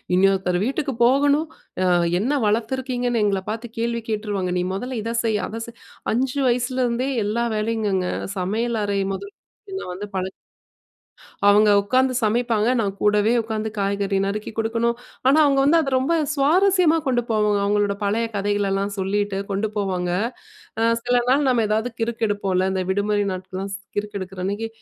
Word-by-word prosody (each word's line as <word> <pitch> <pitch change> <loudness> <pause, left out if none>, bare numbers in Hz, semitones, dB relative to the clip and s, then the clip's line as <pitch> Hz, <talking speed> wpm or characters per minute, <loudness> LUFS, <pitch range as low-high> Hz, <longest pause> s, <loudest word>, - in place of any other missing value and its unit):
"இன்னொருத்தர் 190 -1 +2
வீட்டுக்கு 275 +1 -2
போகணும், 285 +5 +3 0.4
அ - - +2 0.4
என்ன 255 +7 0
வளர்த்துருக்கீங்கன்னு 245 +1 0
எங்கள 195 -2 +1
பார்த்து 230 +1 -7
கேள்வி 235 0 -1
கேட்டுருவாங்க. 205 -4 -2
நீ - - 0
மொதல்ல 245 +4 -3
இத 230 +1 -3
செய், 220 -2 +1
அத 225 +2 -6
செய்" 235 0 -13 0.3
5 260 +4 0
வயசுலருந்தே 250 +1 0 0.2
எல்லா 230 +3 0
வேலையும்ங்கங்க! 210 -4 0 0.3
சமையல் 220 +5 -1
அறை 200 -1 0
முதல் 400 - -7 0.4
என்ன 385 - -4
வந்து 185 +3 -5
பழ 185 -1 -1 1.2
அவங்க 210 +1 +6
உட்காந்து 255 +5 +1
சமைப்பாங்க, 225 0 +1
நான் 200 -4 0
கூடவே 210 +1 +3
உட்காந்து 220 -1 -3
காய்கறி 200 0 0
நறுக்கி 205 +2 -3
கொடுக்கணும். 230 +1 0 0.3
ஆனா 280 +3 +5
அவங்க 280 -1 +3
வந்து 310 +4 +5
அத 280 -4 -1
ரொம்ப 265 +6 +1 0.2
சுவாரஸ்யமா 335 +4 +4
கொண்டு 245 -2 +2
போவாங்க. 210 -2 +2
அவங்களோட 205 0 +1
பழைய 220 +3 +1
கதைகளெல்லாம் 200 0 0
சொல்லிட்டு 200 +1 -1
கொண்டு 200 +2 0
போவாங்க. 185 -3 -1 0.7
அ - - +2 0.2
சில 245 +1 +1
நாள் 275 +3 +3
நம்ம 240 -3 +3
எதாவது 220 +3 0
கிறுக்கெடுப்போம்ல. 205 -5 0
இந்த 190 -1 -1
விடுமுறை 205 +1 +1
நாட்கள்லாம் 185 +1 -5
ஸ் - - -5 0.2
கிறுக்கெடுக்கிறன்னைக்கு, 200 +1 -4
220 Hz, 145 wpm, -22 LUFS, 200-245 Hz, 1.2 s, அவங்க